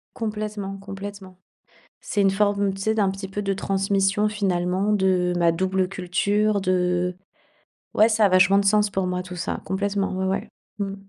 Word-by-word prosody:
Complètement, 210 -3 -4
complètement. 195 -1 -9 0.7
C'est 205 - -2
une 195 -1 +4
forme, 200 0 +1
tu 195 - -7
sais, 220 +2 +1
d'un 205 -3 +2
petit 195 +1 -6
peu 195 +2 -4
de 195 -1 -1
transmission, 195 +1 +1
finalement, 190 -1 0
de 185 -3 +2
ma 170 -1 +3
double 185 +2 0
culture 200 +3 0
de 180 -1 0 0.8
ouais 215 - +5
ça 220 -1 +3
a - - +6
vachement 185 +2 +5
de 200 - +1
sens 210 +1 +3
pour 190 -2 -1
moi, 180 0 -2
tout 180 0 -9
ça, 170 - -3
complètement, 195 +1 -1
ouais, 190 - -1
ouais. 195 +3 -2 0.3
Mmh. 195 -1 -3
195 Hz, 175 wpm, -23 LUFS, 185-205 Hz, 0.8 s, a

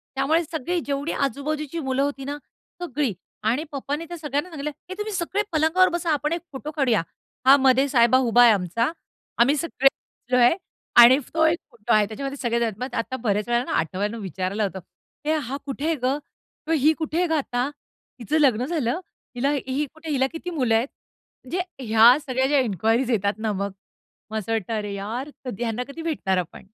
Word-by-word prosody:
त्यामुळे 310 +5 +2
सगळी 330 +2 -2
जेवढी 285 +2 -2
आजू-बाजूची 295 +4 -2
मुलं 265 -2 -1
होती 280 -1 -3
ना, 285 +1 -4 0.4
सगळी 285 - -1 0.3
आणि 240 +8 +1
पप्पानी 290 +3 -3
त्या 345 +1 -7
सगळ्यांना 295 +2 -2
सांगितलं, 300 -2 -4 0.2
"हे 375 - -5
तुम्ही 420 0 -4
सगळे 375 +2 -1
पलंगावर 320 +4 +4
बसा, 340 -1 -2
आपण 300 +2 0
एक 340 - -2
फोटो 290 +3 -6
काढूया." 255 - +2 0.4
हा 270 - +9
मधे 265 +1 +4
साहेबा 245 -1 +5
उभा 235 +1 +5
आहे 235 - +8
आमचा 205 - 0 0.5
,आम्ही 260 +5 +4
सगळे 270 -4 +2
बसलोय 250 +1 +1 0.5
आणि 250 +3 +9 0.2
तो 320 0 +3
एक 325 +2 +3
फोटो 230 -3 -1
आहे 215 -1 +5
त्याच्यामध्ये 275 +6 -5
सगळेजण 235 -2 0
आहेत. 220 - -3
मग 255 0 -5
आता 230 +3 -2
बऱ्याच 210 -2 0
वेळेला 240 0 +2
ना, - - -5
आठवून 200 +7 -1
विचारायला 190 +2 -2
होतं, 190 -1 -3 0.5
"हे 310 - +2
हा 275 -2 -3
कुठे 295 +4 -1
ग? 265 +3 +2 0.5
ही 305 -1 +4
कुठे 325 +3 -1
ग 320 - -5
आता? 255 -4 0 0.5
हिचं 295 +7 0
लग्न 255 -4 +3
झालं? 300 -2 -1 0.4
हिला 275 +4 +1 0.2
ही 275 +3 0
कुठे? 315 0 -9
हिला 265 -2 +2
किती 345 +2 -5
मुलं 255 -9 +1
आहेत?" 230 +4 +2 0.6
म्हणजे 350 +8 -2 0.2
ह्या 225 +3 +7
सगळ्या 260 0 +1
ज्या 285 0 +3
इन्क्वायरीज 225 +3 +1
येतात 200 -3 +1
ना 220 -1 -1
मग, 200 0 -2 0.6
मग 220 - -2
असं 215 +1 -4
वाटत 225 -1 -1
अरे 210 -2 -2
यार, 225 +8 -4 0.2
कधी 240 -2 -4
ह्यांना 235 +1 -2
कधी 320 +4 -8
भेटणार 280 - -1
आपण. 175 -2 -4
265 Hz, 185 wpm, -24 LUFS, 230-305 Hz, 0.6 s, हा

